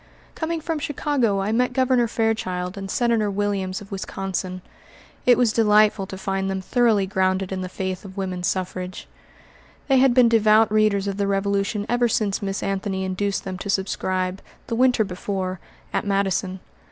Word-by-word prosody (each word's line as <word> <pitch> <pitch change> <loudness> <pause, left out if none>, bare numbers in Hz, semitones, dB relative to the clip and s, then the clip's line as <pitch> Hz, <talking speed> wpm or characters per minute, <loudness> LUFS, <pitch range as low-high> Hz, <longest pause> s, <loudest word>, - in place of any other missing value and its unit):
Coming 325 0 -3
from 320 -1 -2
Chicago, 275 -8 0
I 200 +2 -1
met 250 +2 +1
Governor 255 -2 +3
Fairchild 205 -5 -1
and 195 -1 -6
Senator 230 -1 +1
Williams 200 -1 -2
of 200 - -13
Wisconsin. 190 -1 -4 0.6
It 245 - +7
was 240 -3 +3
delightful 210 -2 +4
to 190 - -7
find 195 0 -2
them 190 0 -2
thoroughly 220 0 +2
grounded 190 0 0
in 190 -1 -3
the 185 - -4
faith 185 0 -4
of 195 -1 -11
woman 185 -2 -3
suffrage. 185 0 -3 0.8
They 270 - +5
had 260 -2 +4
been 250 -2 +6
devout 220 -1 +4
readers 215 -2 +2
of 200 -1 -3
the 200 -1 0
Revolution 200 +1 0
ever 240 0 +2
since 210 -3 0
Miss 195 -1 -3
Anthony 195 -1 -2
induced 195 +1 -1
them 185 -1 -5
to 200 - -6
subscribe, 190 -1 -1 0.2
the 230 - -3
winter 250 -2 +4
before, 185 -1 -4 0.3
at - - 0
Madison. 195 -2 -1
200 Hz, 165 wpm, -23 LUFS, 190-225 Hz, 0.8 s, It